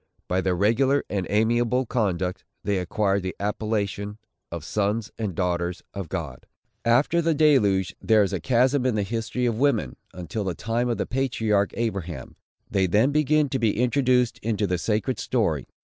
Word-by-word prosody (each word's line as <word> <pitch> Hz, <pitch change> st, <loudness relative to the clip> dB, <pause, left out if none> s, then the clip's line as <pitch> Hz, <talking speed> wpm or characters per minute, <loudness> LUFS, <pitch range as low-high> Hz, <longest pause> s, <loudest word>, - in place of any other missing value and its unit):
By 90 Hz, +1 st, +1 dB
their 95 Hz, -1 st, 0 dB
regular 125 Hz, +9 st, +2 dB
and 95 Hz, -4 st, -1 dB
amiable 120 Hz, +4 st, +2 dB
conduct, 95 Hz, -6 st, -1 dB, 0.2 s
they 100 Hz, -2 st, 0 dB
acquired 100 Hz, +2 st, 0 dB
the 95 Hz, 0 st, -4 dB
appellation 105 Hz, -1 st, -2 dB, 0.3 s
of 85 Hz, -3 st, -6 dB
Sons 105 Hz, +3 st, -1 dB
and 105 Hz, -6 st, -3 dB
Daughters 90 Hz, 0 st, -1 dB
of 95 Hz, -5 st, -6 dB
God. 75 Hz, -9 st, -5 dB, 0.4 s
After 130 Hz, +9 st, +3 dB
the 165 Hz, -1 st, +1 dB
deluge 105 Hz, -, +3 dB
there 110 Hz, -2 st, +4 dB
is 100 Hz, -, -2 dB
a 95 Hz, -, -1 dB
chasm 125 Hz, -, +2 dB
in 125 Hz, -, +1 dB
the 105 Hz, -, +1 dB
history 115 Hz, +4 st, -2 dB
of 115 Hz, -2 st, 0 dB
women, 135 Hz, -, +1 dB, 0.2 s
until 90 Hz, +4 st, -5 dB
the 95 Hz, -3 st, -2 dB
time 115 Hz, +2 st, -1 dB
of 120 Hz, -, 0 dB
the -, -, -1 dB
patriarch 115 Hz, -6 st, 0 dB
Abraham. 95 Hz, -8 st, -4 dB, 0.3 s
They 95 Hz, -2 st, +1 dB
then 110 Hz, +10 st, +3 dB
begin 150 Hz, 0 st, +3 dB
to 135 Hz, -, -1 dB
be 110 Hz, -4 st, +1 dB
introduced 125 Hz, -1 st, +2 dB
into 110 Hz, -1 st, -1 dB
the 90 Hz, -2 st, -1 dB
sacred 110 Hz, +4 st, -1 dB
story. -, -, 0 dB
105 Hz, 170 wpm, -25 LUFS, 95-125 Hz, 0.4 s, there